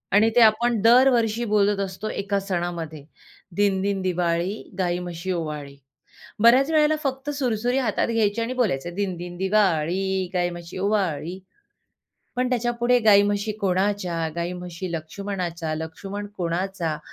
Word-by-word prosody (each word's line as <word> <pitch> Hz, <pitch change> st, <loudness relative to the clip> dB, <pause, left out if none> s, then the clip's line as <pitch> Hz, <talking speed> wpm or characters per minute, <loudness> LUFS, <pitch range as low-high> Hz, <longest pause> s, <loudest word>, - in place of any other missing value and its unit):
आणि 215 Hz, +2 st, +5 dB
ते 245 Hz, -, +6 dB
आपण 230 Hz, +1 st, +4 dB
दरवर्षी 235 Hz, -1 st, +4 dB
बोलत 205 Hz, -1 st, +3 dB
असतो 195 Hz, +2 st, -4 dB
एका 200 Hz, 0 st, -1 dB
सणामध्ये, 175 Hz, -5 st, -4 dB, 0.5 s
दिनदिन 200 Hz, 0 st, +1 dB
दिवाळी, 175 Hz, 0 st, 0 dB, 0.3 s
गाई 175 Hz, -1 st, 0 dB
म्हशी 175 Hz, +1 st, -5 dB
ओवाळी. 150 Hz, -5 st, -4 dB, 0.7 s
बऱ्याच 255 Hz, +5 st, +6 dB
वेळेला 310 Hz, -1 st, +4 dB
फक्त 270 Hz, +1 st, -2 dB
सुरसुरी 245 Hz, -3 st, 0 dB
हातात 230 Hz, -6 st, 0 dB
घ्यायची 225 Hz, -1 st, +1 dB
आणि 230 Hz, +2 st, -2 dB
बोलायचे, 180 Hz, -, -1 dB
दिनदिन 175 Hz, -2 st, -4 dB
दिवाळी, 190 Hz, -1 st, +1 dB
गाई 175 Hz, -1 st, +1 dB
म्हशी 175 Hz, 0 st, -8 dB
ओवाळी. 185 Hz, -3 st, -1 dB, 1.0 s
पण 250 Hz, 0 st, 0 dB
त्याच्यापुढे 240 Hz, 0 st, +1 dB
गाई 200 Hz, -1 st, +8 dB
म्हशी 205 Hz, +1 st, -1 dB
कोणाच्या? 185 Hz, -3 st, 0 dB
गाई 170 Hz, +1 st, -2 dB
म्हशी 180 Hz, 0 st, -6 dB
लक्ष्मणाच्या. 170 Hz, 0 st, -4 dB
लक्ष्मण 195 Hz, +6 st, -6 dB
कोणाचा? 175 Hz, -2 st, -2 dB
195 Hz, 125 wpm, -24 LUFS, 175-220 Hz, 1.0 s, गाई